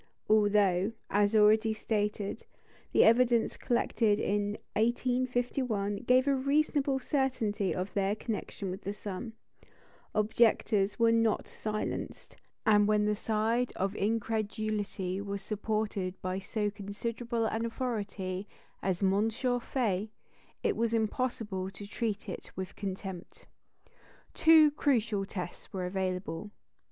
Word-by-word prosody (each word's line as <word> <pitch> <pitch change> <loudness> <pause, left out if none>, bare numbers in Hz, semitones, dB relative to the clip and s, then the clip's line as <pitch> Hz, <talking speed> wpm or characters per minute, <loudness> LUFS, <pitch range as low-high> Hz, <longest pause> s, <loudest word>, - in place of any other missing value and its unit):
Although, 205 -2 +3 0.2
as 205 +2 +3
already 215 +1 +5
stated, 210 -2 -2 0.5
the - - +6
evidence 235 0 +4
collected 225 -3 +1
in 205 +1 0 0.2
1851 245 -2 0
gave 255 +3 +3
a 280 - +4
reasonable 275 0 +1
certainty 250 - 0
of 185 +2 -3
their 200 0 +1
connection 210 -3 -4
with 190 +3 -6
the 200 - -4
sun, 205 +2 -6 0.8
objectors 215 -2 +2
were 230 -1 +4
not 230 -1 +2
silenced; 215 -1 -4 0.3
and 210 -1 +5
when 210 0 +3
the 210 0 +2
side 225 +3 0
of 195 +2 -1
incredulity 210 -3 -1
was 200 -1 -5
supported 210 -3 -2
by 185 +1 -2
so 205 +2 -2
considerable 230 +3 -3
an 225 +1 -1
authority 205 -6 -3 0.3
as 190 0 -1
M. 200 +3 +3
Faye, 235 -4 -1 0.5
it - - +2
was 230 0 +1
impossible 220 -4 -1
to 200 +1 -9
treat 215 0 -3
it 185 - -6
with 185 0 -5
contempt. 190 -2 -6 0.9
Two 315 -2 +7
crucial 230 -9 +1
tests 180 -3 -7
were 185 -2 -3
available. 185 -1 -3
210 Hz, 115 wpm, -31 LUFS, 200-230 Hz, 0.9 s, Two